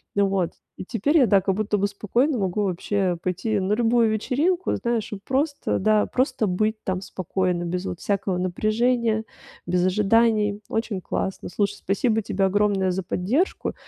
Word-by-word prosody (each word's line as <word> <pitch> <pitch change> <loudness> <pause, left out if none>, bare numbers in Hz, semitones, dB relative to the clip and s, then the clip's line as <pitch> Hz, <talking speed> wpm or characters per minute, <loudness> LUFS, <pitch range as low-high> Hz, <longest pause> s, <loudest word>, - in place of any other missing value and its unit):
М, 200 0 +3
вот. 195 -3 -1 0.2
И - - -7
теперь 260 - +1
я, 270 - +6
да, 200 -2 +4
как 195 0 0
будто 210 0 0
бы 200 0 +1
спокойно 235 +7 0
могу 195 +1 0
вообще 185 -1 -1
пойти 185 +4 -1
на 190 +2 0
любую 230 0 +3
вечеринку, 305 - 0
знаешь, 235 -3 -2
и 200 - -6
просто, 285 +3 0
да, 215 +1 +3
просто 255 -4 0
быть 215 +4 0
там 185 -1 -2
спокойно 185 -1 -2
без 180 +2 -3
вот 175 - -4
всякого 195 -2 -1
напряжения, 220 +4 +1 0.4
без 180 0 +1
ожиданий. 210 +1 +2
Очень 225 -4 -2
классно. 190 +2 -3
Слушай, 205 +2 -1
спасибо 220 +4 0
тебе 195 0 0
огромное 195 -1 +2
за 190 +1 -2
поддержку 220 - -1
205 Hz, 165 wpm, -24 LUFS, 185-225 Hz, 0.4 s, я